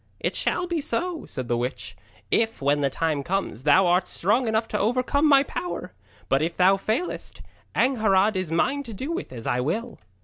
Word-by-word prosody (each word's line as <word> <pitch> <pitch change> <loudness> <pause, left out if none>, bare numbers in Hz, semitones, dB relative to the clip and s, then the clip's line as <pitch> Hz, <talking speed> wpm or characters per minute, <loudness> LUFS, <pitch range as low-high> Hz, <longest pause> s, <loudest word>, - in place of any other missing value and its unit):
'It - - -2
shall 360 - 0
be 345 -3 -2
so,' 330 +6 -2
said 130 -3 -5
the 120 - +1
witch, 120 +2 -4 0.4
'if, 225 0 +1
when 145 +1 +1
the 140 - +2
time 155 +1 -1
comes, 180 - -2
thou 170 +6 +5
art 180 +1 +2
strong 230 +7 +1
enough 220 +1 +1
to 210 - -2
overcome 255 +7 +2
my 275 -1 +6
power. 355 +5 -5 0.3
But 135 +1 +2
if 165 +2 -2
thou 185 +2 +5
failest, 220 - -3 0.3
Angharad 215 -5 +3
is 185 -4 -2
mine 275 +12 +1
to 235 -6 -8
do 270 - -4
with 335 - -4
as 115 -3 -8
I 125 - 0
will.' 225 - -3
205 Hz, 195 wpm, -25 LUFS, 160-255 Hz, 0.4 s, my